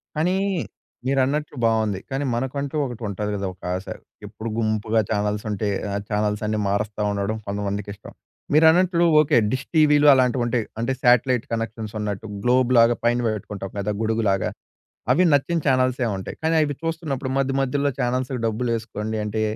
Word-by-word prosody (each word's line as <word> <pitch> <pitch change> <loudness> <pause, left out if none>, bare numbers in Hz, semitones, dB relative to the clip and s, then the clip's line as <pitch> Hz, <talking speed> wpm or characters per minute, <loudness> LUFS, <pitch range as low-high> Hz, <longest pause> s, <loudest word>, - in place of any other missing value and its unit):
కానీ, 175 +4 +1 0.7
మీరన్నట్లు 140 +3 0
బావుంది. 110 -4 +1
కానీ 135 +1 -2
మనకంటూ 135 +3 -3
ఒకటి 120 -3 -7
ఉంటది 105 +1 -3
కదా! 100 -1 -3
ఒకాశ. 90 +1 -4 0.4
ఎప్పుడు 110 +2 -6
గుంపుగా 110 0 +1
ఛానెల్సుంటే 105 0 -1 0.2
ఆహ్, 100 0 -2
ఛానెల్స్ 105 0 0
అన్నీ 110 0 -1
మారుస్తా 105 +1 -2
ఉండడం 100 +2 -2
కొంతమందికి 100 0 -3
ఇష్టం. - - -13 0.4
మీరన్నట్లు 170 +3 +5 0.2
ఓకే. 150 -3 +4
డిష్ 130 +1 -2
టీవీలు 150 -1 +5
అలాంటివి 125 -2 +2
ఉంటాయి 120 -1 0 0.2
అంటే 120 +3 0
శాటిలైట్ 125 0 +3
కనెక్షన్స్ 115 -1 -4
ఉన్నట్టు 105 -1 -4 0.2
గ్లోబ్‌లాగా 120 -1 +4
పైన 120 +1 +2 0.2
పెట్టుకుంటాం 100 -1 -7
కదా! 100 +1 -1
గొడుగులాగా. 110 -4 +1 0.6
అవి 180 - +4
నచ్చిన 165 +4 +2
ఛానెల్సుంటాయి. 130 -6 0
కానీ 160 +1 +2
అవి 145 -1 0
చూస్తున్నప్పుడు 155 -5 -3
మధ్య 135 0 +1
మధ్యుల్లో 140 +2 0
ఛానెల్స్‌కి 125 +1 -1
డబ్బులేసుకోండి 110 -1 -2
అంటే 110 +1 -2
115 Hz, 140 wpm, -23 LUFS, 105-135 Hz, 0.7 s, మీరన్నట్లు